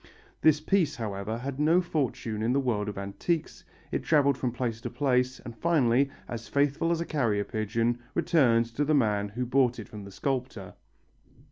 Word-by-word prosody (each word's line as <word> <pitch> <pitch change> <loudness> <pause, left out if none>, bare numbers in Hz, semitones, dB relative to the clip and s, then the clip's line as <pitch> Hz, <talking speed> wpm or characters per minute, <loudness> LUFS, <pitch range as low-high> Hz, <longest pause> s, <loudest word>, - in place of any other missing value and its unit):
This 155 -2 +5
piece, 155 -2 +1
however, 110 -2 -4
had 135 +3 -5
no 160 +4 +4
fortune 135 -10 -2
in 115 +3 +1
the 140 - +3
world 110 -6 -1
of 105 - -7
antiques, 100 - -3 0.3
it - - -1
travelled 140 -3 +3
from 125 -1 -2
place 115 -2 -3
to - - -4
place, 130 -2 +1
and 120 - -9
finally, 135 -3 +2 0.2
as 115 -1 -6
faithful 145 +3 +1
as 170 -1 +1
a - - -2
carrier 115 -11 0
pigeon, 115 +2 -1 0.2
returned 140 -10 +3
to 145 - +1
the 150 +1 +2
man 105 -6 +1
who 115 +5 -6
had 125 0 -3
bought 125 -2 +3
it 110 -4 -7
from 105 -1 -9
the 100 - -10
sculptor. 125 -5 -3
125 Hz, 190 wpm, -28 LUFS, 110-145 Hz, 0.3 s, This